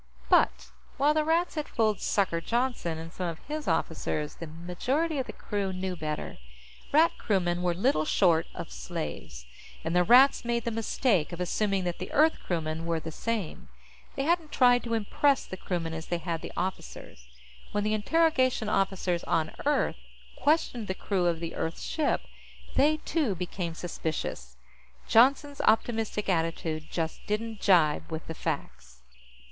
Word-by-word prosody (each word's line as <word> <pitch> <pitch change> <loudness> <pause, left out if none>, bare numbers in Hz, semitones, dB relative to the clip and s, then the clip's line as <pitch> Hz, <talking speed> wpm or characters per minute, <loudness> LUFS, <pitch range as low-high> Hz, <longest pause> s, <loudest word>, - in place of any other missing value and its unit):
But, - - +3 0.3
while 290 +3 +4
the 310 0 +2
Rats 330 +3 +1
had 305 -2 -3
fooled 215 -3 +1
"Sucker" 185 -5 +1
Johnston 235 -7 -1
and 165 +1 -8
some 180 - -3
of 165 -2 -4
his 300 +1 -4
officers, 160 -2 -1
the 165 - -8
majority 250 - -2
of 260 - -2
the - - -5
crew 200 -2 -3
knew 185 0 -3
better. 155 - -4 0.5
Rat 320 +3 +5
crewmen 175 -4 0
were 175 -1 +1
little 190 - +2
short 165 -1 +3
of - - -6
slaves, 60 -4 -6 0.4
and 165 +2 -2
the 180 - +5
Rats 250 +8 +6
made 235 -1 -1
the 235 - 0
mistake 220 - +1
of 175 - -6
assuming 195 +2 0
that 175 -1 -3
the 185 - -6
Earth 315 +2 +4
crewmen 165 -1 -2
were 165 -1 0
the 160 +1 -6
same. 215 -1 -3 0.5
They 275 - -1
hadn't 330 0 +1
tried 245 -1 +5
to 230 -1 0
impress 265 +6 +2
the - - -6
crewmen 170 -3 -3
as 160 0 -6
they 175 - -1
had 170 -1 -3
the - - -7
officers. 175 - -5 0.4
When 205 - 0
the 215 +1 +1
interrogation 255 -1 +2
officers 190 -3 0
on 160 -2 0 0.2
Earth 295 - +2 0.4
questioned 285 -7 +1
the 190 - -2
crew 185 -3 0
of 170 -1 0
the 165 0 -5
Earth 165 +1 -3
ship, 310 -3 0 0.5
they, 305 +3 +4
too, 285 - 0
became 175 -1 -4
suspicious. 155 - -4 0.5
Johnston's 275 +4 +4
optimistic 220 -1 +1
attitude 165 -3 -1
just 165 -2 -3
didn't 220 +1 -2
jibe 160 -4 +3
with 160 0 -4
the 165 - -5
facts. 60 - -5
190 Hz, 165 wpm, -28 LUFS, 165-245 Hz, 0.5 s, Rats